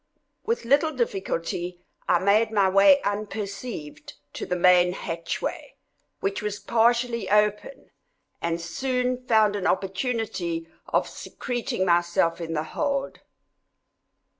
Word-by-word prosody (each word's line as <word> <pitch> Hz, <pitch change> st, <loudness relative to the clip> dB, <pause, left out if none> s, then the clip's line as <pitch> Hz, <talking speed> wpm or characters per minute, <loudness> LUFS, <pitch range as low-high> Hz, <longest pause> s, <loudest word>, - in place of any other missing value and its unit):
With 460 Hz, -, -1 dB
little 285 Hz, +6 st, +3 dB
difficulty 180 Hz, -, -3 dB, 0.3 s
I 175 Hz, -, +5 dB
made 200 Hz, +5 st, +3 dB
my 200 Hz, -3 st, +3 dB
way 200 Hz, +9 st, +5 dB
unperceived 205 Hz, -4 st, -5 dB, 0.2 s
to -, -, -5 dB
the 180 Hz, -, 0 dB
main 180 Hz, 0 st, +5 dB
hatchway, 170 Hz, -, -4 dB, 0.5 s
which 195 Hz, 0 st, -1 dB
was 210 Hz, -1 st, -3 dB
partially 235 Hz, -1 st, +1 dB
open, 210 Hz, -, 0 dB, 0.5 s
and 170 Hz, 0 st, -1 dB
soon 250 Hz, +8 st, -2 dB
found 215 Hz, -2 st, +4 dB
an 200 Hz, -, -1 dB
opportunity 190 Hz, -5 st, -2 dB, 0.2 s
of -, -, +1 dB
secreting 240 Hz, -6 st, -3 dB
myself 170 Hz, -1 st, +2 dB
in 165 Hz, -1 st, -4 dB
the 155 Hz, -1 st, -1 dB
hold. 280 Hz, -2 st, -2 dB
200 Hz, 115 wpm, -25 LUFS, 175-240 Hz, 0.5 s, I